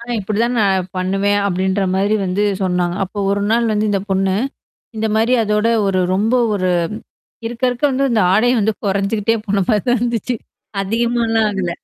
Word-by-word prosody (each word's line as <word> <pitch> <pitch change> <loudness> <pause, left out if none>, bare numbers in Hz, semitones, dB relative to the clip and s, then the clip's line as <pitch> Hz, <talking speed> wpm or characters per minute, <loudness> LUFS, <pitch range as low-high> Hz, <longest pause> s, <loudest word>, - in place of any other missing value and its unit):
ஆனா 240 +1 -6
இப்படிதான் 220 +5 -1
நான் 190 -2 +1
பண்ணுவேன் 195 +2 +1
அப்படின்ற 190 +1 0
மாதிரி 200 +3 +1
வந்து 190 +2 -1 0.2
சொன்னாங்க. 180 -1 0
அப்போ 200 +3 -9
ஒரு 200 0 0
நாள் 230 0 +2
வந்து 215 0 0
இந்த 200 -1 0
பொண்ணு. 190 0 +1 0.6
இந்த 220 0 -1
மாரி 225 +3 +2
அதோட 210 +1 +1 0.2
ஒரு 190 -1 +1
ரொம்ப 215 +5 +1 0.2
ஒரு 185 -2 0 0.8
இருக்க 235 +2 -7
இருக்க 245 +4 -4
வந்து 270 +1 0
அந்த 230 -2 +2
ஆடை 220 +5 +3
வந்து 215 +2 +1
குறைஞ்சுகிட்டே 200 +3 0
போன 200 -1 +1
மாரி 210 -4 +2
தான் 245 0 +3
இருந்துச்சு. 240 0 -1 0.5
அதிகமாலாம் 225 +1 +1
ஆகல. 190 -3 -2
210 Hz, 165 wpm, -18 LUFS, 195-230 Hz, 0.8 s, ஆடை